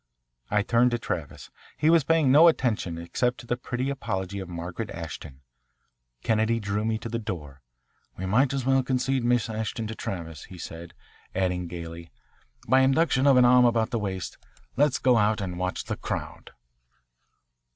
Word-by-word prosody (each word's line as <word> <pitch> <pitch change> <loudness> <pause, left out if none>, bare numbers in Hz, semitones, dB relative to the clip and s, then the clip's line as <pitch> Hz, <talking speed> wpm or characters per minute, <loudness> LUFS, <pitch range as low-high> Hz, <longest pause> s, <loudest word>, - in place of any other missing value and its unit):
I 105 0 +2
turned 120 +3 +3
to 120 - 0
Travis. - - -5 0.3
He 155 +4 +3
was 165 -3 +5
paying 160 -3 +3
no 155 +5 +8
attention 115 - +1
except 120 +9 -1
to 125 - -11
the 120 - -1
pretty 125 +2 -3
apology 95 -7 -3
of 95 -2 -7
Margaret 90 +5 -5
Ashton. 80 -4 -8 0.8
Kennedy 110 +1 +1
drew 105 0 -2
me 110 0 0
to 110 - -7
the 115 0 -3
door. 75 - -6 0.6
"We 95 - -4
might 125 +8 +3
as 135 -2 -2
well 135 0 +4
concede 130 0 0
Miss 120 0 +2
Ashton 110 0 -3
to 110 - -4
Travis," 85 -7 -6
he 95 - -12
said, 85 +1 -9 0.4
adding 90 -1 0
gaily, 85 0 -8 0.6
"by 130 +3 +5
induction 135 0 +3
of 135 -2 +6
an 125 - +6
arm 125 0 +6
about 115 -1 +2
the 115 - 0
waist. 95 -3 -4 0.4
Let's 145 -2 +3
go 125 -2 +3
out 105 0 +2
and 90 -3 -4
watch 90 0 -2
the - - -4
crowd." - - -5
110 Hz, 170 wpm, -26 LUFS, 90-125 Hz, 0.8 s, no